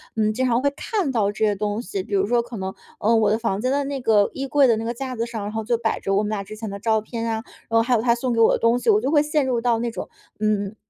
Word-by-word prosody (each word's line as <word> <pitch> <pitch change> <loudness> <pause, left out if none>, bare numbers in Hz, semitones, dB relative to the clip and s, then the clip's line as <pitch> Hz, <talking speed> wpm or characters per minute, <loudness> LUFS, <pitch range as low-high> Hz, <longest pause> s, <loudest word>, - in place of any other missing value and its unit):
嗯， 215 -1 +1
经 255 +4 0
常 240 0 +2
会 280 - +2
看 390 -11 -1
到 210 -5 +1
这 215 +2 0
些 210 - +1
东 210 +2 -2
西。 195 -5 -4
比 210 - -9
如 195 - +2
说 240 +3 +2
可 235 -1 -8
能， 190 0 -4 0.3
嗯， 225 +2 +3
我 215 -2 +3
的 215 - +2
房 220 -4 -2
间 255 +2 0
的 285 +1 +1
那 275 -1 -4
个 210 -3 +3
衣 270 0 -4
柜 280 -1 +4
的 230 - +4
那 220 - -3
个 235 - -2
架 255 +1 -5
子 230 - -1
上， 230 -3 -5
然 205 - -4
后 220 0 -3
就 235 +2 +1
摆 225 -1 -1
着 195 0 -1
我 205 - +2
们 210 - -2
俩 205 -2 -2
之 215 - -9
前 220 0 -6
的 200 0 -6
照 220 +1 +2
片 230 +1 -5
啊， 220 0 -2 0.3
然 230 - +2
后 225 - +6
还 245 +2 0
有 220 - +1
他 235 0 +3
送 245 0 -2
给 230 - 0
我 225 - +6
的 - - +2
东 235 +2 +3
西， - - 0
我 425 -1 +5
就 280 - -1
会 300 -2 +5
陷 300 -2 +1
入 245 -3 0
到 235 -1 +2
那 235 0 -2
种， - - -6 0.3
嗯， 210 -1 0
230 Hz, 360 characters per minute, -23 LUFS, 215-245 Hz, 0.3 s, 后